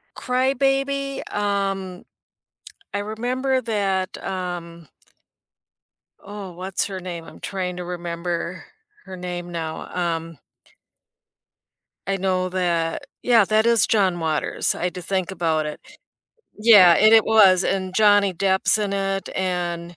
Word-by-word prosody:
Cry-Baby? 275 +1 0
Um, 195 -3 -2 0.9
I 205 - -2
remember 250 +5 -1
that, 200 -4 -2
um 175 -3 -5 1.4
Oh, 200 -3 -8
what's 185 +2 -2
her 190 -1 -6
name? 175 -2 -7
I'm - - -13
trying 180 -2 -4
to 180 - -5
remember 175 0 -4 0.4
her 190 -1 -9
name 175 -1 -6
now. 160 -2 -5 0.3
Um 165 -1 -8 1.7
I 195 0 0
know 185 -1 0
that 170 -3 -1 0.2
Yeah, 230 -4 +5
that 215 +2 +2
is 235 -3 +4
John 190 -5 +2
Waters. 155 -2 -1
I 180 - -3
had 180 - -3
to 180 - -6
think 185 +1 -2
about 160 -4 0
it. 150 - -6 0.8
Yeah, 205 -6 +8
and 215 +5 +5
it 220 - +6
was, 195 -4 +5
and 185 -1 -2
Johnny 205 -2 +4
Depp's 190 +3 +2
in 205 -2 -2
it, 195 0 -2
and 175 -2 -3
190 Hz, 125 wpm, -22 LUFS, 175-210 Hz, 1.7 s, Yeah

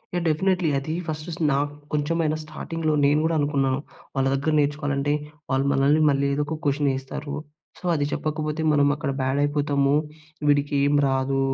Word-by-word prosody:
Yeah! 175 - 0
Definitely. 180 +2 +2
అది 155 +3 -4
first 155 +1 -4 0.2
నాకు 145 +1 0 0.2
కొంచెమైనా 155 +1 0
స్టార్టింగ్‌లో 160 0 -3
నేను 145 +2 +4
కూడా 165 0 +1
అనుకున్నా. 140 -2 +1 0.4
వాళ్ళ 135 -1 +1
దగ్గర 140 +3 0
నేర్చుకోవాలంటే, 145 -1 0 0.4
వాళ్ళు 135 +1 +1
మనల్ని 140 +3 +3
మళ్ళీ 140 0 +1
ఏదో 145 +1 0
ఒక 160 +2 -3
క్వశ్చనేస్తారు. 140 0 -1 0.5
సో, - - -24
అది 145 -3 +1
చెప్పకపోతే 155 0 -2
మనం 145 -1 +4
అక్కడ 145 -2 -2
బ్యాడ్ 130 +2 0
అయిపోతాము. 145 -1 +1 0.5
వీడికి 145 0 +2
ఏమి 145 0 +3
రాదు 135 0 0
145 Hz, 150 wpm, -24 LUFS, 140-155 Hz, 0.5 s, నేను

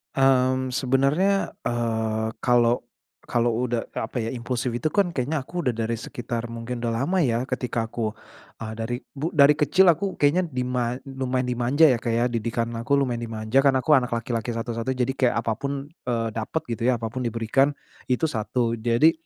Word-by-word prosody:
Mmm, 130 -1 +3
sebenernya, 140 +10 +2 0.2
eee, 110 -2 -1
kalau 120 0 +3 0.4
kalau 120 0 +2 0.2
udah, 120 -1 -1
eee, - - -4
apa 125 - -7
ya, 115 - -3
impulsif 125 0 -2
itu 120 +6 -1
kan 180 +2 +1
kayaknya 140 0 -1
aku 175 +6 -6
udah 125 -8 0
dari 115 0 -2
sekitar 120 -1 -5
mungkin 115 +1 -5
udah 115 -1 -1
lama 185 +5 +1
ya 120 -6 +1
ketika 125 -3 -2
aku, 110 -2 -2 0.5
eee, 110 - -5
dari 115 +2 -2 0.2
bu 145 +3 -3
dari 140 0 +7
kecil 175 +5 +5
aku 190 +4 -2
kayaknya 170 +5 +2
dima 125 -3 -1
lumayan 130 -1 -2
dimanja 125 +6 +2
ya, 125 - +2
Kak, 115 - -2
ya, 120 - +2
didikan 115 0 -1
aku 140 +5 +1
lumayan 130 -4 0
dimanja, 110 +3 0
kan 135 -1 +4
aku 130 +4 +1
anak 125 -1 -4
laki-laki 115 0 -2
satu-satu, 115 +2 -2
jadi 125 +1 0
kayak 130 -2 +1
apa 115 - 0
pun, 140 +1 -4
eee, 120 -8 -2
dapat 115 +9 -3
gitu 115 - -4
ya, 130 - +4
apa 115 -1 -4
pun 130 - -4
diberikan, 115 +4 +2 0.4
itu 125 +4 0
satu. 115 +1 -1
Jadi, 120 +7 +4
125 Hz, 185 wpm, -24 LUFS, 115-135 Hz, 0.5 s, dari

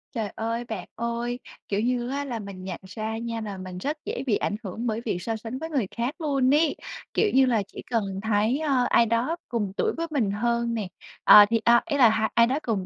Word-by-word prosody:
Trời 220 -3 -2
ơi, 230 +2 -2
bạn 220 -6 -6
ơi, 235 +1 -3 0.3
kiểu 200 - 0
như 245 +1 0
á 280 +1 -2
là, 240 -4 -4
mình 195 -3 -8
nhận 185 -2 -5
ra 220 +3 -4
nha 230 0 -4
nà 205 -3 -5
mình 185 -1 -7
rất 290 +11 -3
dễ - - -3
bị 220 - +3
ảnh 205 - -1
hưởng 220 +5 -4
bởi 220 0 -1
việc 210 - -1
so 225 +4 -2
sánh 225 +3 -6
với 320 - -5
người 270 -10 0
khác 240 +5 -1
luôn 275 -3 +2
ấy, 305 0 +3 0.4
kiểu 430 - +2
như 265 0 +6
là, 230 -5 +2
chỉ - - -9
cần 230 -3 +2 0.2
thấy, 220 +5 +1
ơ, 275 -5 +2
ai 235 - +5
đó 230 +8 0
cùng 215 -5 -1
tuổi - - +1
với 335 0 -2
mình 240 -10 +1
hơn 235 +2 0
nè, 215 -4 -2 0.4
à, 210 -1 +10
thì 230 0 +2
a, 235 0 +6
ý 295 -4 -1
là 245 -5 +7
ha 220 0 +1
ai 235 0 +5
đó 265 +4 0
cùng 210 -8 -2
230 Hz, 245 wpm, -26 LUFS, 215-255 Hz, 0.4 s, à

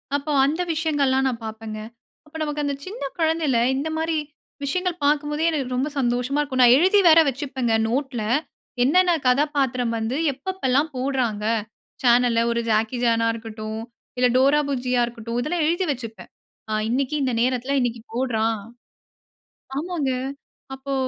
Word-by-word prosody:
அப்போ 290 +1 -2
அந்த 315 +5 0
விஷயங்கள்லாம் 285 -4 +1
நான் 240 -3 -3
பார்ப்பேங்க. 220 0 -6 0.5
அப்போ 305 +1 -10
நமக்கு 295 -1 -2
அந்த 280 - -1
சின்ன 385 -5 -7 0.2
குழந்தையில 320 -6 +1 0.2
இந்த 285 +4 -2
மாதிரி 320 0 -1 0.5
விஷயங்கள் 360 +3 -2
பார்க்கும் 295 0 +2
போதே 310 +2 0
எனக்கு 265 -5 -2
ரொம்ப 270 +4 0
சந்தோஷமா 245 +3 0
இருக்கும். 260 -3 0
நான் 245 0 +8
எழுதி 380 +5 +4
வேற 325 +1 +8
வச்சுப்பேங்க 260 -3 -1 0.2
நோட்ல 255 -2 -2 0.6
என்னென்ன 350 +6 +4
கதாப்பாத்திரம் 255 -3 +1
வந்து 230 +5 -2 0.2
எப்ப 275 +5 -24
எப்போ 375 - -7
எல்லாம் 285 +5 +2
போடுகிறாங்க? 250 -5 -1 0.6
சேனல்ல 240 -1 +4
ஒரு 235 - 0
ஜாக்கி 220 +3 +1
சான்னா 230 -1 +2
இருக்கட்டும், 220 -1 -6 0.4
இல்ல 250 0 +4
டோரா 275 +3 +5
புஜ்ஜியா 250 -2 0
இருக்கட்டும். 235 0 -6
இதெல்லாம் 310 +3 0
எழுதி 345 +3 +1
வச்சுப்பேன். 230 -4 -7 0.4
அ - - 0 0.2
இன்னைக்கு 270 +4 0
இந்த 255 - 0
நேரத்தில 255 +2 0
இன்னைக்கு 240 -2 -1
போடுறான். 225 -3 0 1.2
ஆமாங்க. 315 -4 -1 0.6
அப்போ 270 +1 -5
265 Hz, 145 wpm, -23 LUFS, 240-295 Hz, 1.2 s, நான்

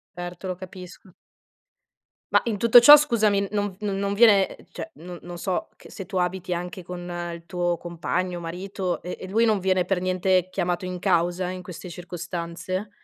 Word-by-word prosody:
Certo, 175 +1 -7
lo 185 - -2
capisco. 185 +1 -11 1.2
Ma - - +5
in 225 -3 -1
tutto 235 +3 +8
ciò 290 +5 +11
scusami, 215 -8 +2
non 205 -1 -1
v - - -22
non 200 -2 -2
non 200 0 -1
viene, 205 -3 +5 0.2
cioè - - -7
non 175 +2 -9
non 175 0 -8
so, 190 +4 -2
che - - -16
se 195 - -7
tu 190 - -4
abiti 180 0 -1
anche 180 +2 -5
con 180 +1 -7 0.3
il 170 0 -9
tuo 175 -1 -1
compagno, 175 +1 -3
marito 180 +2 -4
e 180 - -5
e 185 - -7
lui 225 +4 +3
non 215 -3 +2
viene 185 -1 +1
per 180 -1 0
niente 185 0 +1
chiamato 175 0 -2
in 180 0 -4
causa 175 0 +1
in 185 0 -5
queste 180 0 -9
circostanze 175 +2 -5
185 Hz, 185 wpm, -25 LUFS, 175-195 Hz, 1.2 s, ciò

